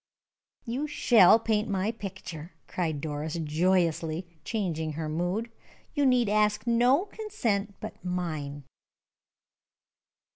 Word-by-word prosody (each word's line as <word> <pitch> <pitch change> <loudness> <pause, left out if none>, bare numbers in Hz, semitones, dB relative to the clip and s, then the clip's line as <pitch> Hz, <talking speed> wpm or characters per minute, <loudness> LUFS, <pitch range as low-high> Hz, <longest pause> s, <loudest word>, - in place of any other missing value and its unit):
"You 260 +5 -2
shall 225 -8 +6
paint 220 -1 0
my 200 +2 0
picture!" 175 -6 -8
cried 160 -5 -2
Doris, 150 +1 -3
joyously, 165 +1 +1 0.2
changing 160 -8 -2
her 155 +1 -4
mood. 175 +9 -2 0.4
"You 290 -3 +3
need 250 -3 +4
ask 210 +1 +2
no 245 - +4
consent 235 - -2
but - - -8
mine!" 155 -6 -3
190 Hz, 105 wpm, -28 LUFS, 160-230 Hz, 0.4 s, shall